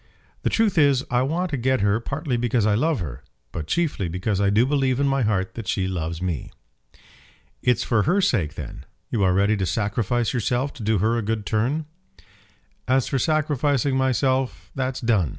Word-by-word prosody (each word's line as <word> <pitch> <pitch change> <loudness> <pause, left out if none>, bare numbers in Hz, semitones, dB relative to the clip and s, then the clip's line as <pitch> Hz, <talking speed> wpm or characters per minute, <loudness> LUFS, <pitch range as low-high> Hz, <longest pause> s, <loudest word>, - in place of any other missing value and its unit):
"The - - 0
truth 215 -6 +2
is, 140 -3 +4
I 125 0 +3
want 165 +7 -1
to 145 - -1
get 130 0 +1
her, 100 +2 +2
partly 140 +2 -3
because 120 -2 +1
I 105 - +3
love 145 +2 +1
her; 70 -5 -6 0.3
but 75 - -5
chiefly 155 - 0
because 95 +4 -1
I 100 - +3
do 110 +4 +4
believe 135 -2 +1
in 140 - +2
my 135 0 +1
heart 95 -4 0
that 115 -4 -7
she 95 -1 0
loves 85 -2 -3
me." 85 -7 -3 1.1
"It's 125 - +2
for 115 -3 +2
her 175 - +2
sake 100 - +1
then! - - -8 0.3
You 110 - 0
are 90 -2 +3
ready 100 +3 +3
to 95 - 0
sacrifice 115 +4 0
yourself 125 +3 0
to - - -11
do 110 0 +2
her 115 +5 +1
a - - -1
good 110 -1 -2
turn." 125 +10 0 1.0
"As 130 0 +2
for 135 - 0
sacrificing 145 -3 +1
myself, 130 0 0
that's 130 0 -2
done. 110 - +2
120 Hz, 190 wpm, -23 LUFS, 100-135 Hz, 1.1 s, is